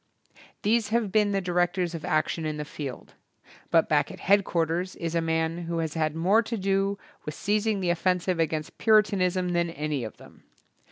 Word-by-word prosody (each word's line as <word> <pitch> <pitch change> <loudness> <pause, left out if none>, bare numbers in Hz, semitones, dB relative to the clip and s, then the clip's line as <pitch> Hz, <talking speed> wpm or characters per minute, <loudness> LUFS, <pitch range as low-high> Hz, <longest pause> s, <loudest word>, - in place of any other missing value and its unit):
These 220 0 +2
have 225 -3 0
been 210 -1 +3
the 195 -1 0
directors 175 0 0
of 165 -2 -6
action 155 +1 0
in 155 -1 -2
the 150 - -4
field, 140 -3 -7 0.6
but 165 -1 +4
back 150 -1 +2
at - - -10
head 200 +1 +4
quarters 170 +1 -1
is 165 -1 -4
a 170 - +1
man 160 +1 -1
who 170 0 -3
has 160 -2 -2
had 155 -1 -1
more 190 +7 +4
to 230 +1 -4
do 195 0 0 0.3
with 150 - -5
seizing 210 0 0
the 175 -2 +1
offensive 180 0 0
against 155 -1 -2
Puritanism 190 -4 +3
than 170 -1 +1
any 150 -4 -3
of 110 - -7
them. - - -17
175 Hz, 185 wpm, -27 LUFS, 160-195 Hz, 0.6 s, but